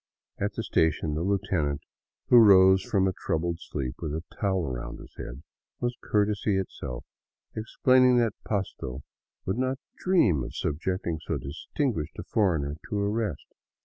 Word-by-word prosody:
At 100 0 -1
the - - -3
station 80 -1 +1
the 75 - -1
lieutenant, 90 -7 0 0.5
who 120 - +9
rose 95 -3 +7
from 95 0 +1
a 95 - 0
troubled 85 -2 -1
sleep 65 -7 -4
with 75 - -3
a 80 - -4 0.2
towel 95 -4 +1
around 60 -2 -5
his - - -13
head, - - -8 0.4
was 120 0 -1
courtesy 105 -1 +1
itself, 60 -9 -5 0.5
explaining 125 +3 +4
that 115 -3 +2
Pasto 70 - -3 0.4
would 95 +6 -1
not 130 +1 0 0.2
dream 110 - +3
of - - -7
subjecting 85 +1 -2
so - - -2
distinguished 80 - -3
a - - -5
foreigner 80 -9 0
to 105 - -1
arrest. 100 - -1
95 Hz, 145 wpm, -27 LUFS, 75-105 Hz, 0.5 s, who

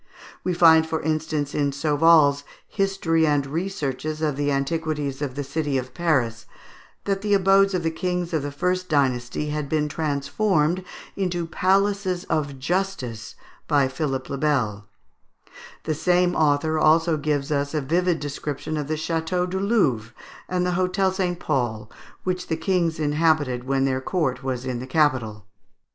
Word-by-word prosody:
We 180 -1 -1
find, 160 -2 +7
for 160 0 -1
instance, 155 -2 -1
in 140 -1 +1
Sauval's 145 0 +4 0.2
"History 195 -5 +1
and 145 -2 +2
Researches 155 -2 -3
of 150 -3 +1
the 145 +1 -1
Antiquities 145 0 -2
of 135 -3 -3
the 145 - -3
City 140 0 -1
of 130 -1 -5
Paris," 130 -10 0 0.6
that 195 -1 -1
the 205 -1 +2
abodes 195 0 +4
of 175 - -1
the 165 - 0
kings 180 +1 -2
of 160 - +1
the 145 +1 -4
first 180 +5 -1
dynasty 135 -1 0
had 150 -2 -3
been 150 -1 +1
transformed 155 +4 0 0.3
into 180 -3 -1
Palaces 190 +1 +1
of 145 -4 -1
Justice 135 - -3 0.3
by 145 -3 +3
Philip 135 -1 -3
le 140 - -4
Bel; 115 -9 0 1.0
the 155 - -1
same 180 +3 +2
author 155 +1 +2
also 160 +2 +4
gives 150 -1 -1
us 145 +1 -1
a - - +2
vivid 170 +4 +1
description 145 +1 -4
of 150 -2 -3
the 155 - -1
Château 165 +3 -1
du 190 +1 -3
Louvre, 140 - +1 0.3
and 180 0 0
the 180 - 0
Hôtel 185 +1 +1
St. 180 -2 -1
Paul, 120 -7 -2 0.3
which 180 -1 -2
the 160 - -1
kings 170 -2 0
inhabited 150 -4 +1
when 135 0 +1
their 130 -1 0
court 135 -5 -1
was 130 -1 -3
in 125 -2 -3
the 130 - -7
capital. 130 - +1
155 Hz, 155 wpm, -24 LUFS, 140-175 Hz, 1.0 s, find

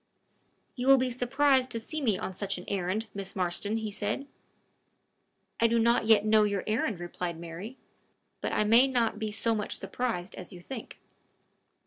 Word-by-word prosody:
"You 250 0 -3
will 270 0 +8
be 255 -1 0
surprised 260 +1 +2
to 230 - -3
see 310 +7 -4
me 220 -8 +2
on 190 - -5
such 195 +1 -3
an 180 - -9
errand, 195 +3 -1
Miss 195 -1 -2
Marston!" 190 +4 0
he 220 -2 -3
said. 210 +6 -2 1.3
"I 230 - +5
do 235 +1 +2
not 230 -1 +3
yet 215 -2 +5
know 215 0 +5
your 200 -2 0
errand," 215 -3 -1
replied 175 -1 -4
Mary; 170 +9 -8 0.6
"but - - -2
I - - +2
may 230 +5 +6
not 235 -5 0
be 220 -1 -2
so 225 +2 0
much 210 -2 -2
surprised 220 -8 -3
as 180 - -9
you 180 - -10
think." 230 +6 -8
220 Hz, 175 wpm, -29 LUFS, 195-240 Hz, 1.3 s, will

